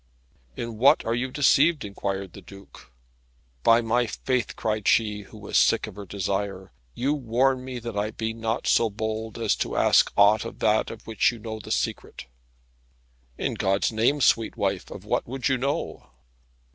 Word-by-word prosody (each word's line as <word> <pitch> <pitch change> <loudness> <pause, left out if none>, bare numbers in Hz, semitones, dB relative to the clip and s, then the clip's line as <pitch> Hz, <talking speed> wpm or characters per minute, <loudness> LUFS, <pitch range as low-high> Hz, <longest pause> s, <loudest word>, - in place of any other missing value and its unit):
"In 115 -2 -5
what 135 +4 +5
are 115 - 0
you 125 +2 -1
deceived?" 145 +1 +3
inquired 100 -2 -4
the 100 - -11
Duke. 95 -9 -15 0.7
"By 115 - +5
my 120 +1 +1
faith," 125 +2 -2
cried 110 -1 -2
she, 105 -2 +2
who 105 +2 -14
was 105 -1 0
sick - - +3
of - - -10
her 100 -1 -9
desire, 95 0 -3 0.2
"you 135 +4 0
warn 130 -1 +1
me 130 -1 -6
that 115 -2 -6
I 105 +1 -1
be 110 +1 -4
not 115 0 -3
so 115 - +3
bold 110 +1 -4
as - - +1
to - - -3
ask - - +4
aught 105 +2 +5
of 115 - -8
that 110 0 +1
of 115 -1 -10
which 110 +2 +2
you 120 - -9
know 110 0 -7
the - - -11
secret." - - -3 1.1
"In - - -2
God's 95 +3 0
name, 120 +7 +1
sweet 115 -3 +2
wife, - - -2
of - - -10
what - - -1
would 130 +1 -2
you 135 -2 +1
know?" 135 - -3
110 Hz, 180 wpm, -25 LUFS, 105-120 Hz, 1.1 s, what